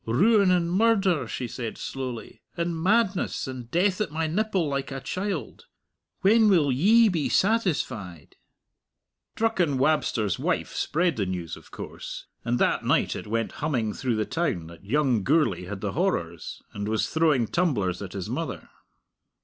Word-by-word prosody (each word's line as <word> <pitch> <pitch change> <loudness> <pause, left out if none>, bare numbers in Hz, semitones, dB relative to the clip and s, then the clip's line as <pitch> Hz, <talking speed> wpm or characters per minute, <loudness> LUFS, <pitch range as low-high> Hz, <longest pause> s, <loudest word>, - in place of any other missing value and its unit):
"Ruin 200 - +4
and 175 -2 +2
murder," 195 -5 +3
she 125 - -4
said 115 -1 -5
slowly, 125 -4 -6 0.2
"and 170 0 -1
madness; 200 0 +1
and 125 -3 -7
death 185 +5 +1
at 210 - 0
my 160 +2 -2
nipple 190 0 0
like 140 -1 -2
a 135 - -4
child! 185 - -4 0.5
When 215 +2 +5
will 160 -8 +4
Ye 215 - +5
be 170 -7 0
satisfied?" 150 - 0 1.0
Drucken 185 -11 +1
Wabster's 130 - +1
wife - - -1
spread 170 0 0
the 100 -3 0
news, 90 -3 -4
of - - -16
course, - - -8 0.2
and 120 +1 0
that - - +1
night - - +2
it - - -7
went 115 +1 -1
humming 125 -8 0
through 125 -4 -1
the 110 0 0
town 160 - -1
that 85 +1 -13
young 125 +1 +1
Gourlay 150 - +2
had 95 +1 -6
the - - -2
horrors, 85 - -2
and 100 0 -4
was 110 0 0
throwing 155 -7 +3
tumblers 105 - 0
at 95 -2 -7
his 95 -3 -4
mother! - - -4
150 Hz, 155 wpm, -26 LUFS, 110-185 Hz, 1.0 s, When